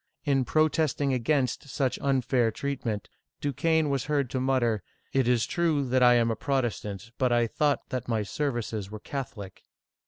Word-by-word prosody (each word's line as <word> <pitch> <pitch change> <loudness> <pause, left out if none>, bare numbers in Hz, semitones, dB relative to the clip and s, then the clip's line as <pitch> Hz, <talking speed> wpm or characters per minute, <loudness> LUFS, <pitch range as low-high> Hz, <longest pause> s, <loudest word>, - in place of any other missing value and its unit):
In 135 -3 +2
pro 155 +4 +3
testing 145 -3 0
against 130 +2 0
such 135 -1 -1
unfair 130 -3 +2
treatment, 115 -4 -3 0.3
Du 145 -1 -2
quesne 160 +2 +2
was 140 -3 -1
heard 140 -4 0
to 130 - -1
mutter, 125 -5 +1 0.3
"It 135 -3 +2
is 120 -2 +3
true 160 -5 +1
that 130 +1 +2
I 125 -1 +7
am 115 -1 +3
a - - -1
Protestant, 115 -5 -2
but 125 -2 +2
I 120 0 +3
thought 145 +5 0
that 130 -3 -3
my 110 -3 0
services 115 -5 -3
were 105 0 -7
Catholic!' 115 -7 -7
130 Hz, 175 wpm, -28 LUFS, 115-140 Hz, 0.3 s, I